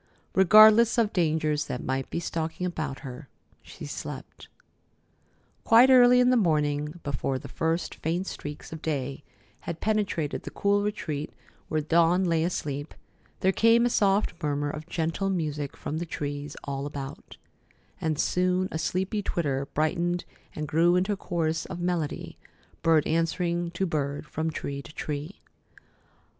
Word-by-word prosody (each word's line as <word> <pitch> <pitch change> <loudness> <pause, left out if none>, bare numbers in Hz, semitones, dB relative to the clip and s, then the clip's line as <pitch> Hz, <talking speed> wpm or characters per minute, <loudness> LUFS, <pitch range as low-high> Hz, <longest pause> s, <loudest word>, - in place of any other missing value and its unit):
Regardless 215 +5 +7
of 225 -3 +2
dangers 155 -4 +1
that 125 - -5
might 135 0 -2
be - - -2
stalking 165 +1 -3
about 155 -6 -4
her, 135 0 -9 0.3
she - - -10
slept. - - -7 1.2
Quite 240 +4 +7
early 250 -1 +7
in 250 0 +5
the - - +4
morning, 150 -5 +1
before 135 -1 -2
the - - -9
first 165 +1 -1
faint 170 +4 -2
streaks 145 -3 -7
of 160 - -7
day 140 -3 -3 0.4
had 170 -1 -6
penetrated 205 -8 -1
the - - -7
cool 200 0 +1
retreat 155 -8 -3 0.4
where 155 -1 0
Dawn 170 +4 +3
lay 165 -3 +2
asleep, 145 -4 -3 0.5
there 190 - +4
came 230 +4 +4
a 245 - +1
soft 200 -1 +2
murmur 145 -1 -1
of 155 +2 -8
gentle 165 +4 -1
music 150 -6 -2
from 155 - -4
the 170 - -4
trees 145 -1 -5
all 140 0 -3
about; 140 -1 -8 0.6
and 160 -2 0
soon 185 +3 +1
a 160 - -3
sleepy 190 +5 -1
twitter 140 -8 -1
brightened 175 +3 0 0.3
and 155 0 -4
grew 170 +4 +3
into 190 +3 +1
a - - -2
chorus 165 -4 -2
of 185 -2 -6
melody, 175 -4 -3 0.4
bird 165 -2 +4
answering 170 +1 0
to 175 +3 -2
bird 145 -4 -2
from 160 +1 -2
tree 140 -2 -4
to 150 - -14
tree. 150 +5 -5
165 Hz, 150 wpm, -27 LUFS, 150-185 Hz, 1.2 s, Regardless